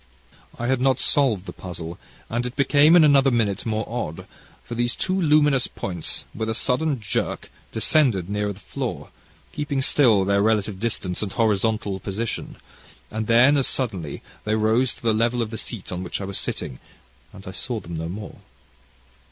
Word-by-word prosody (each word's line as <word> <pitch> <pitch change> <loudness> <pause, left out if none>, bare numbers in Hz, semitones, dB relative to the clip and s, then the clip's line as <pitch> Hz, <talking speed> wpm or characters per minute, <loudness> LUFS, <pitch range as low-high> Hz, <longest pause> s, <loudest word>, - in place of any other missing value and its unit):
I 120 - -3
had 130 0 +1
not 130 -1 +3
solved 120 -10 +2
the - - -7
puzzle, 85 -2 -7 0.3
and 120 +2 -1
it 125 - -7
became 145 +3 +5
in 170 - +8
another 140 -2 +5
minute 115 -5 0
more 110 -1 -1
odd, 115 -9 -4 0.4
for - - -8
these 120 0 0
two 185 - -1
luminous 150 -7 +3
points, 90 -4 -4
with 110 0 -3
a 110 - 0
sudden 140 +3 +1
jerk, 105 - -3 0.2
descended 110 - +2
nearer 105 +1 -1
and - - 0
nearer 100 - -2
the 95 - -15
floor, - - -5 0.4
keeping 145 -2 -2
still 115 -9 +4
their 100 +1 +2
relative 105 -2 +1
distance 100 -5 -1
and 100 -3 -3
horizontal 105 -2 +1
position, 105 +4 -4 0.6
and 110 0 -3
then, 130 +5 +6
as 135 - +4
suddenly, 95 - -3 0.2
they 105 0 0
rose 110 +4 +2
to - - -18
the 115 -1 +3
level 115 +2 +1
of 115 -2 -1
the - - -4
seat 110 -6 -5
on 90 0 -3
which 90 - -4
I 100 - -4
was 95 0 -2
sitting 60 - -4 0.5
and 100 -1 -13
I 95 - -6
saw 115 +4 -3
them 85 -3 -8
no 80 +1 -4
more. 100 +2 -7
110 Hz, 185 wpm, -23 LUFS, 100-130 Hz, 0.6 s, in